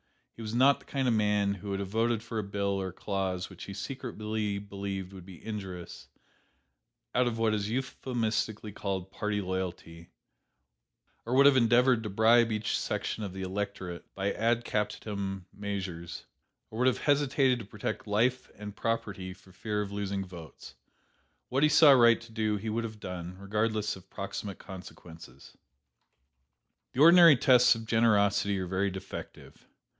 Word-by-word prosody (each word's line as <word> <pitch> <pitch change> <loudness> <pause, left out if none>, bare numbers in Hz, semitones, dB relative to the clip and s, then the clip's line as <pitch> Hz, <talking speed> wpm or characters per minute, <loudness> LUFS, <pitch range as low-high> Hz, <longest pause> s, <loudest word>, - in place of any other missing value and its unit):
He - - -10
was 110 +1 -4
not 135 +3 +5
the - - -20
kind 135 -2 -1
of 120 - +3
man 105 -2 +2
who 100 +1 -8
would 100 0 -2
have 100 -1 -4
voted 115 +1 0
for 115 -1 -4
a - - -2
bill 100 -1 -1
or 95 - -3
a - - -6
clause 95 -2 -2
which 95 - -9
he 100 - -8
secretly 110 -5 -3
believed 100 -1 -5
would 95 -1 -11
be 90 -3 -13
injurious, 95 -5 -7 1.1
out 125 0 +3
of 115 -2 -2
what 115 -1 +2
is 105 -1 -1
euphemistically 115 -3 -2
called 95 -2 -4
'party 105 -1 -2
loyalty,' 90 -3 -5 1.1
or 120 +2 -2
would 140 +1 +6
have 140 -1 +7
endeavored 120 0 +4
to 110 - -5
bribe 115 +3 +4
each 105 -1 -1
section 110 - -3
of 100 -3 -5
the 95 0 -5
electorate 95 -2 -4
by 100 +1 -1
'ad 115 +1 +1
captandum' 100 -3 -3
measures, 95 -4 -5 0.5
or 110 - -6
would 125 - +3
have 130 - +3
hesitated 140 -3 +2
to 110 - -8
protect 105 +2 -5
life 120 +5 +1
and 105 0 -8
property 100 -5 -3
for 95 - -20
fear 105 +2 -2
of 100 - -8
losing 100 -1 -3
votes. 85 -4 -11 0.8
What 135 +2 0
he 150 - +5
saw 150 0 +7
right 120 -3 +6
to 115 -1 -14
do 110 -1 0
he 110 +2 -4
would 115 +1 -1
have 110 -1 -8
done, 90 -1 -6
regardless 105 +2 -1
of 95 0 -15
proximate 100 0 -5
consequences. 85 -7 -12 1.4
"The 130 - 0
ordinary 170 -1 +9
tests 125 0 +6
of 115 0 -7
generosity 100 -3 +3
are 95 - -2
very 95 +2 0
defective. 95 +1 -9
105 Hz, 165 wpm, -29 LUFS, 95-115 Hz, 1.4 s, ordinary